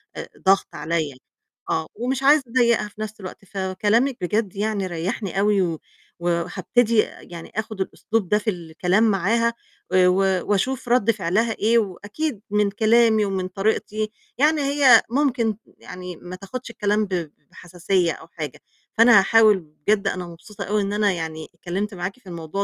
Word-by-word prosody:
آآ - - -7 0.2
ضغط 195 +1 +4
عليَّ. 150 -3 -2 0.5
آه. 160 0 -1
ومش 255 +4 -2
عايزة 290 +1 +5
أضايقها 235 -3 +2
في 210 +1 -12
نفس 215 0 -6
الوقت، 190 0 -9
فكلامِك 205 +7 0
بجد 205 +2 -1
يعني 205 -1 -1
ريَّحني 185 +3 -3
أوي 205 0 +3
و 165 -4 -1 0.4
وهابتدي 180 +7 0 0.2
يعني 170 -1 -10
آخد 220 -2 -4
الأسلوب 210 0 -2
ده 210 - +4
في 215 +1 -2
الكلام 180 +2 0
معاها، 225 +3 +2 0.4
آآ 185 -1 +5
و 180 +2 +3
و 190 -2 +1
وأشوف 245 +5 -1
رد 240 -2 +4
فعلها 215 +3 0
إيه، 225 +2 +2
وأكيد 210 - -3
من 210 0 +2
كلامي 220 0 +3
ومن 190 -2 -2
طريقتي 215 +2 -1 0.3
يعني 300 +3 +3
هي 275 -4 +6
ممكن 240 -5 +1 0.2
يعني 180 -1 -9
ما 180 +2 -9
تاخدش 200 +7 -8
الكلام 210 -1 0
ب 180 -5 -3 0.2
بحساسية 175 0 -1
أو 160 - -10
حاجة، 155 -5 -7 0.4
فأنا 230 -2 +8
هاحاول 215 0 +5 0.3
بجد 205 -1 +2
أنا 180 -2 -2
مبسوطة 175 +5 -9
أوي 210 +1 0
إن 200 0 -2
أنا 210 -1 +2
يعني 160 -3 -5
اتكلمت 190 +5 -4
معاكِ 195 +5 -5
في 205 - -22
الموضوع 170 +3 -4
205 Hz, 160 wpm, -22 LUFS, 180-225 Hz, 0.5 s, فأنا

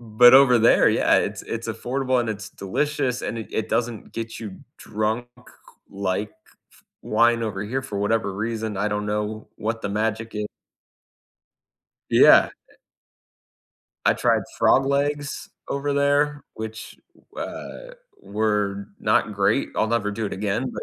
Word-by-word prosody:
but 120 +2 +6
over 130 -3 +7
there, 115 +1 +5
yeah, - - +3
it's - - -3
it's - - -5
affordable, 130 0 -1
and 120 - -2
it's 105 -1 -5
delicious, 130 +6 -2
and 115 - -3
it 110 - -7
it 110 - -2
doesn't 120 -2 -2
get 115 0 -5
you 105 -4 -8 0.2
drunk, 110 +3 -2 0.6
like 100 +1 -2
f 110 0 -29 0.5
wine 115 +1 +2
over 105 -3 -3
here, 130 +6 -3
for 105 -7 -5
whatever 105 -1 0
reason. 110 0 -3
I 105 +2 0
don't 105 0 -2
know 105 +1 -3
what 115 +1 -3
the 105 - -2
magic 110 +2 -2
i 105 0 -2 1.6
Yeah. - - +7 0.2
I - - -22 1.3
I - - +5
tried - - +2 0.2
frog 135 +1 +4
legs 145 +1 -1 0.2
over 140 +1 -1
there, 145 +1 +1
which, 110 0 -8 0.4
w - - -4 0.4
uh, - - -14 0.3
were 105 -1 -1
not 105 - +1
great. 100 +6 +1
I'll 110 - +2
never 115 -3 0
do 110 +1 -3
it - - -6
again, 105 +6 -2
but - - -6
110 Hz, 150 wpm, -23 LUFS, 105-125 Hz, 1.6 s, over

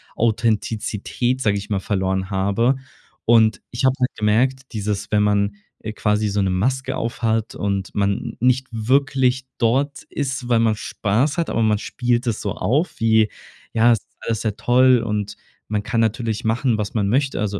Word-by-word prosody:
Authentizität, 115 +2 0
sag 105 -5 +2
ich 100 +1 -5
mal, 100 -2 0
verloren 95 -1 -1
habe. 100 +7 +1 0.5
Und 110 -2 +4
ich 120 +2 -1
habe 130 - +5
halt 125 0 +2
gemerkt, 120 +5 +2
dieses, 105 -2 -3
wenn 105 -1 +3
man, 100 0 +1 0.3
äh, 110 - -5
quasi 105 0 0
so 100 0 0
'ne 95 - +1
Maske 130 +8 0
aufhat 115 -1 -1
und 100 -1 -2
man 100 -1 +2
n 115 +3 -6
nicht 130 +1 +2
wirklich 130 +2 +1
dort 135 +5 +1
ist, 135 -3 -4
weil 120 -2 +4
man 115 -1 +2
Spaß 115 - -1
hat, 170 - 0
aber 115 - 0
man 110 -1 +3
spielt 120 +3 -1
es 110 -3 0
so 100 - -2
auf 145 +11 0
wie 110 -1 +3 0.4
„Ja, 115 +1 +5
ist 115 -5 0
alles 115 -1 -2
sehr 110 -3 -2
toll“, 125 +2 +4
und 105 -2 -3 0.3
man 105 -1 -2
kann 115 +2 0
natürlich 115 -1 -1
machen, 115 +1 +1
was 105 -1 -3
man 105 -3 +1
möchte. 135 +4 +1
Also 105 -1 -2
110 Hz, 175 wpm, -21 LUFS, 105-125 Hz, 0.5 s, habe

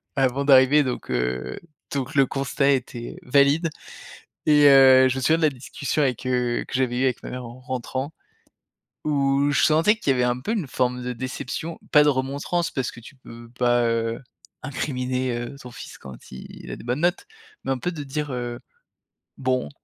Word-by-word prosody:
avant 135 +1 +1
d'arriver 135 +2 +6
donc 125 - -4
heu, 65 0 -2 0.3
donc 135 0 -3
le 135 -1 +5
constat 140 +1 0
était 120 -3 -3
valide 140 +5 +3 0.8
et 150 -1 +5
heu, 130 -1 +8
je 130 - -1
me - - -2
souviens 160 +5 +3
de - - -4
la 155 - +5
discussion 140 +3 -3
avec, 130 -1 -1
heu, 125 -1 0
que - - -10
j'avais 125 -1 0
eue - - +1
avec 125 - -1
ma - - -6
mère 125 -1 -6
en 120 +2 -10
rentrant 130 +3 -4 0.9
où 140 -1 +1
je - - +2
sentais 165 +8 +4
qu'il 215 -12 0
y - - +4
avait 125 - +1
un 125 0 0
peu 215 - -2
une 185 - -2
forme 125 0 -1
de 125 - -3
déception, 130 +6 -5
pas 150 0 +7
de 150 - +4
remontrances 140 +6 -1
parce 130 -2 -2
que - - -12
tu 140 +4 -14
peux 115 -2 -13
pas, 120 -1 +3
heu, 115 0 -1 0.4
incriminer, 130 -3 -2
heu, 120 +3 -6
ton 125 - -10
fils - - -10
quand 65 -2 -10 0.2
il 65 - -10
a - - -4
des - - -12
bonnes 125 +5 -2
notes, 175 +2 +1 0.4
mais - - -1
un - - -3
peu 180 +8 -3
de 150 -4 -6
dire: 145 +1 -4
«Heu, 120 -1 -4 0.8
bon 130 - -1
130 Hz, 195 wpm, -24 LUFS, 125-145 Hz, 0.9 s, heu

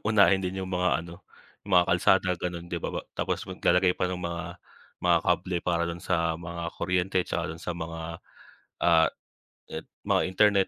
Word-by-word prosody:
unahin 100 -3 +5
din 95 +1 -3
yung 95 - -5
mga 90 -1 +2
ano, 85 0 -11 0.4
yung 100 - -8
mga 90 - +4
kalsada 95 +1 +3
gano'n 85 0 -4
'di 85 - -4
ba - - -2
ba - - -2 0.2
tapos - - -2
maglalagay 90 0 +3
pa 90 - 0
ng 90 - -3
mga 85 -1 -4 0.6
mga - - +5
kable 90 -1 +1
para 85 -1 +1
dun 85 0 -5
sa 85 -2 +1
mga 85 0 -6 0.2
kuryente, 90 +1 0
tsaka - - -2
dun 85 - -13
sa - - -3
mga, 80 -1 -5 0.8
ah, 85 -2 +5 0.6
it - - -6 0.2
mga - - +4
internet 100 0 +4
90 Hz, 180 wpm, -28 LUFS, 85-95 Hz, 0.8 s, unahin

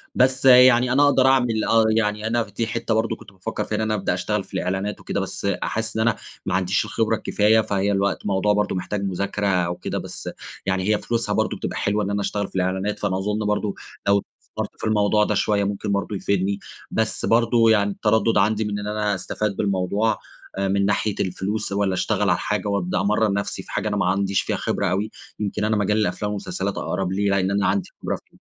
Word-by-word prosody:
بس 130 +1 +2
يعني 125 -1 +7
أنا 140 +2 +5
اقدر 135 -2 +4
اعمل، 125 -4 +3
آه 115 -1 +4
يعني 105 -1 0
أنا 115 +1 +1
دي 110 +2 -4
حتة 115 0 -2
برضه 110 0 +1
كنت - - -15
بافكَّر 95 +4 -4
فيها 110 - -3
إن 110 - -1
أنا 110 0 0
ابدأ 95 -4 0
اشتغَل 105 +3 -1
في - - -22
الإعلَانات 95 +3 -2
وكده، - - -3
بس - - -4
حاسس 110 0 -2
إن - - +1
أنا 115 -1 +2 0.3
ما - - -1
عنديش 95 +2 +1
الخبرة 115 0 0
الكفاية، 110 +1 +3
فهي 100 -1 0
الوقت 100 0 0
موضوع 100 +1 +2
برضه 105 -1 0
محتاج 100 +2 -3
مُذاكرة 100 +2 -1
أو 90 -2 +1
كده. - - -4
بس - - -6 0.4
يعني 95 -1 0
هي 105 - +4
فلوسها 115 +2 -2
برضه - - 0
بتبقى - - -4
حلوة 105 +1 0
إن 100 - -2
أنا 100 0 -1
اشتغَل 100 0 -2
في - - -19
الإعلَانات، 95 +2 -1
فأنا 95 -2 0
أظن 105 +2 -1
برضه 105 -1 0 0.3
لو 100 0 +4 0.2
استثمرت - - -5
في - - -1
الموضوع 105 0 +3
ده 105 - 0
شوية 100 0 +2
ممكن 100 +1 -2
برضه 100 +1 -1
يفيدني. 100 +1 0 0.3
بس 110 -1 -1
برضه 115 0 +4
يعني 100 -2 +3
التّردُّد 110 +2 +2
عندي 105 +2 +2
من 105 0 -2
إن 105 - -5
أنا 105 -1 0
أستفِيد 100 +2 -3
بالموضوع 100 +2 +1 0.4
من 100 0 +1
ناحية 105 +1 0
الفلوس، 100 +3 -2
والّا 100 -1 +1
اشتغَل 90 - 0
على - - +3
حاجة - - -2
وابدأ 90 -3 0
أمرّن 105 +1 +2
نفسي 100 0 -3
في - - -13
حاجة - - -1
أنا 105 -1 -1
ما 95 - +1
عنديش 95 +1 +1
فيها - - -2
خبرة 100 - -1
أوي. 100 +4 -1 0.3
يمكن 105 0 -2
أنا 110 0 +1
مجال 105 +1 +1
الأفلام 105 -1 -1
والمسلسلات 100 -1 -3
أقرب 95 -1 -2
لي 100 +2 0
لإن 100 -1 +1
أنا 100 -1 +1
عندي 100 -1 0
خبرة - - -1
فيه. - - -24
105 Hz, 215 wpm, -23 LUFS, 100-110 Hz, 0.4 s, يعني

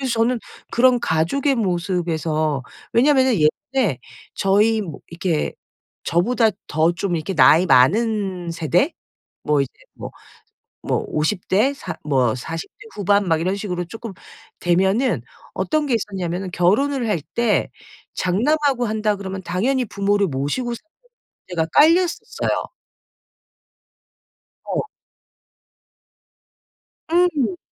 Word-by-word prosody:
저는 230 +2 +1 0.3
그런 245 0 +4
가족의 205 - +1
모습에서 170 - -1 0.3
왜냐하면은 260 +1 +4
예전에 165 - 0 0.3
저희 210 +3 +2
뭐 165 -8 -7
이렇게 170 -2 -1 0.5
저보다 225 +6 +2 0.2
더 160 +3 +2
좀 175 +1 -2
이렇게 165 +4 -3
나이 155 +6 +6
많은 190 - +2
세대 170 - +1 0.5
뭐 150 -2 +2
이제 135 - -4 0.2
뭐 - - -8 0.8
뭐 - - -1
50 160 +5 -1
대 215 +9 +3
사 180 -10 -6
뭐 130 -6 +1
40 160 +6 -6
대 - - -12
후반 200 -1 +2
막 160 -1 +2
이런 185 +4 0
식으로 180 -4 -3
쪼끔 225 +4 -8 0.5
되면은 190 +8 +1 0.3
어떤 310 -1 0
게 260 - +1
있었냐면은 190 -4 -3
결혼을 235 +9 +1
할 205 -6 0 0.2
때 235 -3 +1 0.4
장남하고 255 - +1
한다 215 0 0
그러면 195 -1 -6
당연히 240 +10 0
부모를 200 -1 +1
모시고 160 - -2
사는 320 +7 -14 0.6
문제가 165 -3 -1
깔렸었어요. 335 +3 +2 1.9
어. - - -2 2.2
음. 315 - +2
195 Hz, 225 characters per minute, -21 LUFS, 170-240 Hz, 2.2 s, 나이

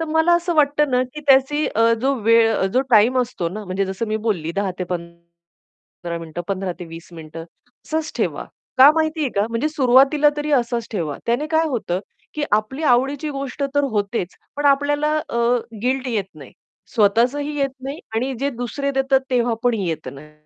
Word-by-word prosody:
तर 325 - 0
मला 320 +2 +4
असं 345 0 0
वाटतं 295 -1 +3
ना, 250 0 +2
की 255 +4 -8
त्याची 275 +3 +4
अ, 230 +1 +4
जो 275 +2 +1
वेळ, 225 -1 +4
जो 255 - +4
टाईम 235 +4 +5
असतो 230 -9 -3
ना 210 +4 -7
म्हणजे 185 +1 -1
जसं 190 +4 -3
मी 215 - 0
बोलली 165 -5 -1
10 200 -1 0
ते 180 - -2
पंधरा 170 0 -10
मिनिट, 165 0 -9
15 190 -2 -2
ते 175 - -7
20 165 0 -11
मिनिट 160 -1 -11
असंच 245 - -7
ठेवा, - - -2 0.3
का 270 +3 +10
माहितीये 315 -3 0
का? 200 +1 +1
म्हणजे 230 +6 0
सुरुवातीला 280 +1 +4
तरी 295 0 -3
असंच 235 -1 -4
ठेवा. 160 -8 -3
त्याने 240 +6 0
काय 320 0 +3
होतं, 205 -9 -2 0.3
की 300 -1 -1
आपली 215 +8 0
आवडीची 275 +3 +2
गोष्ट 275 0 -5
तर 285 0 +3
होतेच, 205 -3 -2 0.2
पण 290 0 0
आपल्याला 290 +2 +2
अ, - - -4 0.5
गिल्ट 255 +1 0
येत 220 -5 -1
नाही. 140 -4 -13 0.4
स्वतःचही 245 +8 +2
येत 275 -1 +1
नाही 275 +4 -5 0.2
आणि 255 +4 -1
जे 280 +1 0
दुसरे 245 +3 -3
देतात 270 0 +2
तेव्हा 240 -2 +1
पण 245 -1 +2
येत 165 -9 -3
नाही. 150 +2 -13
245 Hz, 180 wpm, -21 LUFS, 195-285 Hz, 0.5 s, का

